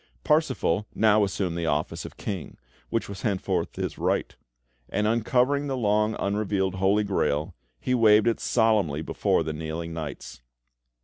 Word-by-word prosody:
Parsifal 130 - +1
now 110 -1 +4
assumed 95 -3 -1
the 85 -1 -2
office 75 0 -1
of - - -10
King, 95 -7 -5 0.3
which 115 - -1
was 100 -1 -7
henceforth 100 -4 -1
his - - -4
right; - - 0 0.5
and, 105 - 0
uncovering 125 +6 +2
the 135 -1 -2
long 105 -1 +1
unrevealed 100 -2 0
Holy 95 +3 +2
Grail, 80 -6 0 0.3
he 125 - -1
waved 110 -3 +5
it 115 -1 +1
solemnly 105 -10 +2
before 80 - +1
the 80 0 -3
kneeling 80 +2 -5
knights. 75 -6 -7
105 Hz, 145 wpm, -26 LUFS, 85-110 Hz, 0.5 s, waved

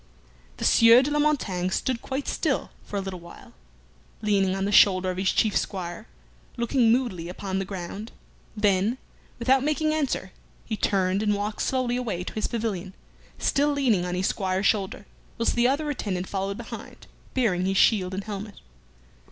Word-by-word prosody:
The - - -3
Sieur 230 +2 +7
de 290 - -2
la 295 - +1
Montaigne 215 -12 +1
stood 240 +5 -1
quite 270 +1 -4
still - - -1
for 205 - -5
a - - 0
little 190 -2 -6
while, 170 0 -14 0.7
leaning 195 -3 +2
on 195 0 -1
the 200 - -1
shoulder 185 -2 +5
of 180 - -6
his 190 0 +2
chief 215 -2 +1
squire, 185 +3 -3 0.5
looking 235 0 +3
moodily 225 -9 0
upon 190 +1 -3
the 195 - -2
ground; 195 +3 -6 0.5
then, 205 +3 +2 0.4
without 260 +2 +3
making 310 +1 +1
answer, 275 -11 -1 0.3
he 220 - -2
turned, 195 -1 +1
and 210 -1 +2
walked 205 +1 -3
slowly 255 -2 0
away 210 -8 -3
to - - -7
his 215 - -1
pavilion, 205 -5 -3 0.4
still 290 +1 +2
leaning 245 -10 +2
on 180 0 -2
his 185 +1 -1
squire's 190 0 -1
shoulder, 200 -1 0 0.3
whilst 230 - +1
the 240 0 +3
other 285 +4 0
attendant 190 -9 -3
followed 195 0 -3
behind, - - -9 0.3
bearing 190 -8 +1
his 195 0 0
shield 190 -4 +3
and 195 - -3
helmet. 205 0 -6
205 Hz, 170 wpm, -26 LUFS, 190-240 Hz, 0.7 s, Sieur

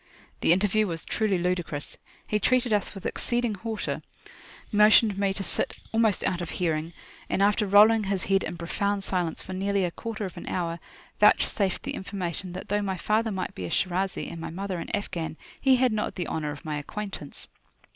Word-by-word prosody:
The - - +3
interview 205 +4 +3
was 165 -2 -4
truly 215 -4 +1
ludicrous. 175 -4 -2 0.3
He 210 - 0
treated 245 +1 +2
us 210 0 0
with 195 - -9
exceeding 240 -2 0
hauteur, 220 +2 -3 0.7
motioned 210 0 +6
me 200 0 +1
to 195 - -3
sit - - 0
almost 225 -3 +2
out 175 - 0
of 175 - -4
hearing, 165 -2 -1 0.4
and 195 - +2
after 210 +1 +3
rolling 210 +2 +6
his 195 -1 0
head 195 0 +2
in 175 - -4
profound 200 +4 -1
silence 180 -4 -1
for 190 - -7
nearly 195 0 +1
a 175 - -2
quarter 220 +2 -5
of 185 - -8
an - - -8
hour, 170 -2 -2 0.4
vouchsafed 205 -2 +4
the - - -3
information 185 -2 -4
that - - -7
though 205 +1 +1
my 190 -2 -2
father 220 +4 +1
might 190 -3 -3
be 90 - -5
a - - -4
Shirazi, 185 - -1
and 165 - -7
my - - -4
mother 185 +1 -4
an - - -6
Afghan, 175 -6 -3 0.2
he 265 -1 +5
had 250 -2 +3
not 215 - -2
the 180 - -2
honour 155 -2 -2
of 145 +1 -8
my 150 -1 -2
acquaintance. 195 -2 -7
195 Hz, 195 wpm, -27 LUFS, 175-210 Hz, 0.7 s, motioned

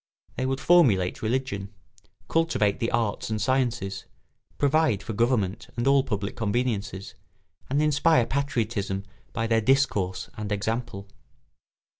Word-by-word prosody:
They 130 - -1
would 135 0 -1
formulate 125 - +4
religion, 110 -4 -2 0.6
cultivate 160 -12 +1
the 115 - 0
arts 115 -3 -1
and 110 -1 -1
sciences, 120 -7 -1 0.5
provide 145 -7 +2
for 115 - -5
government 115 -2 0
and 120 - -1
all 135 0 +5
public 105 -4 -3
conveniences, 105 -3 -2 0.6
and 145 +3 +2
inspire 150 -3 +3
patriotism 115 -8 -2 0.3
by 115 - -2
their 115 0 +2
discourse 105 -7 +1
and 105 -1 -5
example. 105 -1 -3
115 Hz, 120 wpm, -26 LUFS, 100-130 Hz, 0.6 s, all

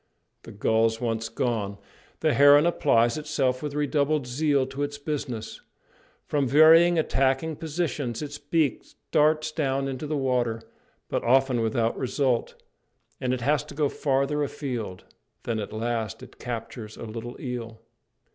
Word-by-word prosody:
The - - -11
gulls 110 +2 +1
once 115 -1 -2
gone, 105 -5 -2 0.4
the 155 -2 +3
heron 145 +4 +7
applies 120 -7 +2
itself 135 -4 -1
with 150 -1 -4
redoubled 150 0 +1
zeal 140 +2 +1
to 135 +2 -6
its 145 0 -2
business. 145 -6 -5 0.6
From 145 -2 0
various 165 +5 +7
attacking 135 +1 +1
positions 150 -6 -3
its 145 0 -7
beak 150 0 0 0.3
darts 155 +1 +3
down 135 -3 -1
into 135 +3 -4
the 150 0 -1
water, 125 -4 0 0.4
but - - -2
often 130 0 +3
without 115 +1 0
result, 130 -2 0 0.6
and 125 - -1
it 130 -1 -1
has 145 +4 +2
to - - -11
go 145 -1 +1
farther 140 +1 0
afield; 120 - -4 0.4
then 115 -2 -2
at 105 - -5
last 110 0 -3
it - - -14
captures 115 -2 -6
a - - -8
little 115 +2 -7
eel. 115 -3 -6
135 Hz, 145 wpm, -26 LUFS, 115-150 Hz, 0.6 s, heron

